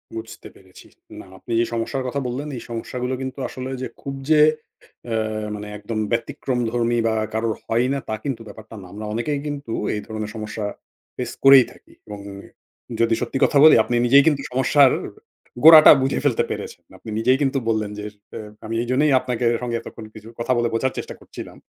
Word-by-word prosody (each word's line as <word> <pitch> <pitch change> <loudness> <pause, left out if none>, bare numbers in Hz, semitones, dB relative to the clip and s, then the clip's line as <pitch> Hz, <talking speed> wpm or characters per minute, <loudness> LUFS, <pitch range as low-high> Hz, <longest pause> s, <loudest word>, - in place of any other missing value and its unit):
বুঝতে 115 0 -8
পেরেছি। - - -17 0.3
না - - -11
আপনি 120 - -11
যে 120 - +2
সমস্যার 130 +3 -2
কথা 140 +3 -2
বললেন 130 +5 -4
এই - - -7
সমস্যাগুলো 125 +2 -4
কিন্তু 130 +1 -6
আসলে 130 0 -7
যে - - -3
খুব 140 - -5 0.2
যে 155 -1 +6 0.7
এ - - +1 0.4
মানে 105 0 -7
একদম 110 +2 -5
ব্যতিক্রমধর্মী 120 -2 -1
বা 110 - 0 0.2
কারো 110 +1 -1 0.2
হয়ই 120 +3 +1
না 140 - -1
তা 110 - -1
কিন্তু 130 -5 -3
ব্যাপারটা 110 +2 -12
না। 90 - -12
আমরা 105 +1 -7
অনেকেই 130 +6 -2
কিন্তু 140 -5 -5 0.2
এই 105 - -4
ধরনের 110 -1 -5
সমস্যা 110 -1 -5 0.5
ফেস - - -4
করেই 135 -2 +8
থাকি - - -20
এবং 105 -1 -8 0.8
যদি 115 0 +3
সত্যি 125 +2 -2
কথা 145 - +1
বলি 155 - +9
আপনি 120 +2 -2
নিজেই 140 +3 +6
কিন্তু 145 -3 +2
সমস্যার 130 +1 +4 0.7
গোড়াটা 160 -1 +10
বুঝে 135 +1 0
ফেলতে 130 -6 +2
পেরেছেন। - - -7
আপনি - - -11
নিজেই 125 +3 +3
কিন্তু 135 -1 +1
বললেন 110 -2 -1
যে - - -6 0.3
এ - - -6 0.3
আমি 115 +1 -4
এইজন্যই 135 +4 +2
আপনাকে 125 -1 -3 0.2
সঙ্গে 120 -1 -2
এতক্ষণ 115 -1 -10
কিছু 110 0 -12
কথা 125 +2 0
বলে 120 0 +1
বোঝার 130 +3 0
চেষ্টা - - -6
করছিলাম। - - -11
120 Hz, 180 wpm, -22 LUFS, 115-135 Hz, 0.8 s, গোড়াটা